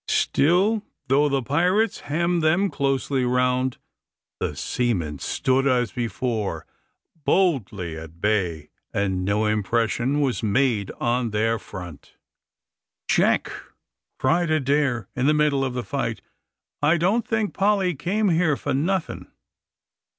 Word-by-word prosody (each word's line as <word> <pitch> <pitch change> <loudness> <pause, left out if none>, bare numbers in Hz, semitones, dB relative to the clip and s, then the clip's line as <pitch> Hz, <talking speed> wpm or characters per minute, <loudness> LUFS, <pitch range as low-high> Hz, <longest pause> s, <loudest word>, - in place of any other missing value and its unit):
Still, 190 +9 +2 0.3
though 145 +3 +4
the 135 -2 0
pirates 180 - +1
hemmed 170 +3 0
them 170 +5 +2
closely 135 -1 0
round, 125 +1 +1 0.6
the - - -2
seamen 90 - -2
stood 135 +1 +1
as 125 -3 +1
before, 110 - -3 0.6
boldly 110 - +1
at 80 +1 -10
bay, 90 -7 -1 0.2
and 95 -2 -1
no 100 +3 +1
impression 115 +5 0
was 135 -4 0
made 110 -2 +1
on 120 0 0
their 110 +2 0
front. 90 -7 -10 0.9
"Jack," - - +2 0.7
cried 165 +5 +1
Adair, 140 -5 +1
in 125 +2 +1
the 150 - +4
middle 150 -2 +2
of 130 -2 -2
the 125 - -2
fight, 115 -7 -3 0.6
"I 155 +4 +4
don't 195 +8 +2
think 220 -4 -1
Polly 195 -2 +2
came 190 +8 0
here 165 -4 +2
for 145 - -2
nothing. 170 +6 -1
130 Hz, 120 wpm, -24 LUFS, 110-160 Hz, 0.9 s, though